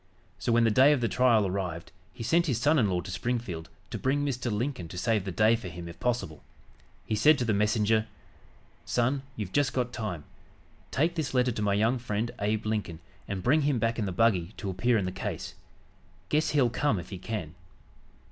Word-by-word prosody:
So, 120 - -1
when 115 0 +4
the 115 - +4
day 135 +6 +6
of 140 - 0
the 115 - +2
trial 115 -4 +3
arrived 90 -3 -3 0.2
he 95 - -8
sent 170 +8 +2
his 125 -6 0
son 150 +5 +3
in 105 -5 +3
law 90 -1 0
to 95 - -8
Springfield 95 -5 -3 0.2
to - - -4
bring 145 +2 +1
Mr. 125 -3 -2
Lincoln 110 -4 -2
to 90 - -9
save 105 +1 +1
the 95 - -3
day 110 +6 +4
for 110 -5 -6
him 85 0 -7
if 85 - -10
possible. 120 -11 -2 0.6
He - - -3
said 145 +8 +5
to 125 - -1
the 110 - +1
messenger: 105 +1 +2 0.8
"Son, 130 +3 0
you've 105 -4 -5
just 140 +2 +1
got 125 -1 -1
time. 95 -9 -4 0.7
Take 160 +5 +1
this 155 -6 -3
letter 125 0 +3
to 110 - -4
my 100 -1 +2
young 115 +5 +2
friend, 115 0 -2
Abe 105 +1 -1
Lincoln, 105 -7 -2 0.3
and 95 -2 -4
bring 150 +5 +4
him 145 -2 +1
back 115 +1 0
in 105 - -1
the - - -2
buggy 95 -2 +2
to 100 -2 -3
appear 115 +6 +2
in 100 - 0
the 90 - -2
case. 95 - -5 0.8
Guess 155 +1 +2
he'll 135 -5 +3
come 145 -3 +1
if 90 0 -7
he 95 - -6
can." 90 -7 -5
110 Hz, 215 wpm, -28 LUFS, 95-125 Hz, 0.8 s, day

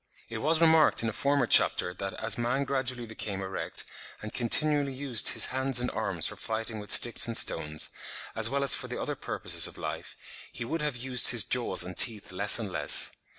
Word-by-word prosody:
It 115 -1 -7
was 160 +5 0
remarked 160 -6 +3
in 115 - -2
a - - -7
former 140 +2 -1
chapter 90 -5 +4
that 95 +1 -7
as - - -1
man 125 +3 -2
gradually 130 -3 -4
became 105 -3 -7
erect, 95 0 -6 0.4
and 110 - -10
continually 145 +3 +2
used 130 -4 +2
his - - +2
hands 130 -1 -1
and 125 - -4
arms 100 -7 -3
for - - -4
fighting 110 0 -5
with 105 - -12
sticks 120 0 +3
and 115 - 0
stones, 75 0 -1 0.4
as 110 0 +3
well 140 +2 -2
as 140 - +5
for - - -4
the - - -7
other - - -5
purposes - - +1
of - - -12
life, - - -8 0.3
he 120 - -8
would 165 +7 -5
have 150 -3 -3
used 125 0 +5
his 120 -3 +5
jaws 125 -7 -1
and 90 0 -10
teeth 110 -4 +1
less 100 +3 +3
and 110 -5 -7
less. - - +3
120 Hz, 205 wpm, -27 LUFS, 110-135 Hz, 0.4 s, as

